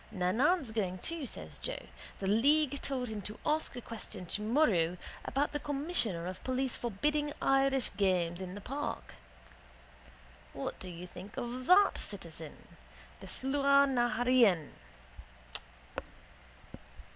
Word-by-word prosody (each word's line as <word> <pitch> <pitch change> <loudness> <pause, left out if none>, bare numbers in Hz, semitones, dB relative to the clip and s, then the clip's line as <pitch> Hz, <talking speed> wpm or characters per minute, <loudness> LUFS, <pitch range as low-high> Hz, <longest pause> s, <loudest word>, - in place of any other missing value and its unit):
—Nannan's 230 - +2
going 190 -5 -1
too, 320 - -3
says - - -6
Joe. - - -3 0.3
The 195 - -4
league 280 +7 +3
told 255 -3 -2
him 215 -2 -4
to 210 +3 -7
ask 310 -2 +1
a 245 - -5
question 215 -5 -7
tomorrow 210 - +2 0.3
about 285 +2 0
the 295 - -2
commissioner 275 - 0
of 185 +1 -6
police 260 0 -1
forbidding 295 +7 0
Irish 270 -1 +3
games 180 -3 +1
in 185 0 -5
the 205 - -7
park. 280 +7 -4 1.4
What 270 - -4
do 185 - -7
you 175 0 -7
think 185 +3 -11
of 250 +1 -4
that, 390 +3 +6
citizen? 165 -6 -6 0.5
The - - -10
Sluagh 280 +1 +3
na 240 -2 +2
h 245 - +1
Eireann. 220 - +5
240 Hz, 130 wpm, -32 LUFS, 190-280 Hz, 1.4 s, that